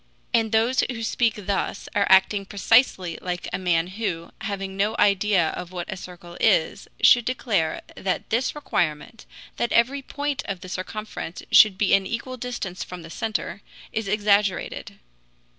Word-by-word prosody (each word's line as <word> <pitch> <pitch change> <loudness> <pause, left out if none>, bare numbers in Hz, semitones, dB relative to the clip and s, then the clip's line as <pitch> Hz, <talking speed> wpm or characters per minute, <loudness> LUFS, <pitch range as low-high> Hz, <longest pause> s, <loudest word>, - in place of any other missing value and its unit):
And 225 -2 +2
those 230 +3 +3
who 230 -3 -4
speak 230 0 +1
thus 200 0 -3
are 200 -1 +2
acting 190 +1 +5
precisely 200 -4 +2
like 180 -1 -4
a - - -1
man 175 -3 +2
who, 185 -3 -4
having 195 -2 -4
no 205 +3 0
idea 200 -4 +3
of 180 0 -6
what 180 0 -5
a - - -7
circle 175 -1 -11
is, - - +2 0.2
should 240 - +7
declare 220 -10 -1
that 190 -1 -3
this 235 +6 0
requirement, 190 - -2 0.3
that 235 - -1
every 260 +4 +3
point 285 +1 -3
of 190 -3 -4
the 185 - -9
circumference 190 -1 -6
should 210 -3 +7
be 200 -1 +2
an 195 -1 +3
equal 255 +4 -4
distance 230 -7 -5
from 180 -2 -9
the 165 - -10
center, 215 -1 -3 0.3
is 220 -2 -2
exaggerated. 205 -2 0
200 Hz, 160 wpm, -24 LUFS, 185-230 Hz, 0.3 s, should